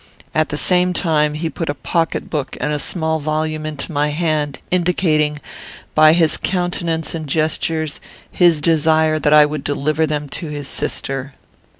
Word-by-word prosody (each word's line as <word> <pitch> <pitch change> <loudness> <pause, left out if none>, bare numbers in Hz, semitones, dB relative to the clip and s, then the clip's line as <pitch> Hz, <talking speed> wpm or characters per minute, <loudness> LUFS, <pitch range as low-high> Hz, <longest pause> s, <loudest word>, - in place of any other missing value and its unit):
At 155 0 +1
the 150 - -3
same 180 +2 +2
time, 150 -4 +1
he 160 +2 -2
put 160 0 -4
a 145 - -1
pocket 165 +4 -1
book 150 -4 -4
and 150 -1 -1
small 160 0 0
volume 155 +1 -2
into 155 +2 -5
my 145 -1 +1
hand, 150 -2 -1
indicating, 165 -4 +1 0.5
by 155 0 +6
his 165 -2 +3
countenance 175 -3 -1
and 160 -2 -5
gestures, 155 +1 -1 0.3
his 170 -4 +3
desire 155 0 +3
that 150 - +1
I 150 0 +8
would 150 -1 -4
deliver 155 +2 0
them 150 -1 -3
to 165 - -5
his 145 -2 -5
sister. 135 0 -3
155 Hz, 160 wpm, -18 LUFS, 150-165 Hz, 0.5 s, I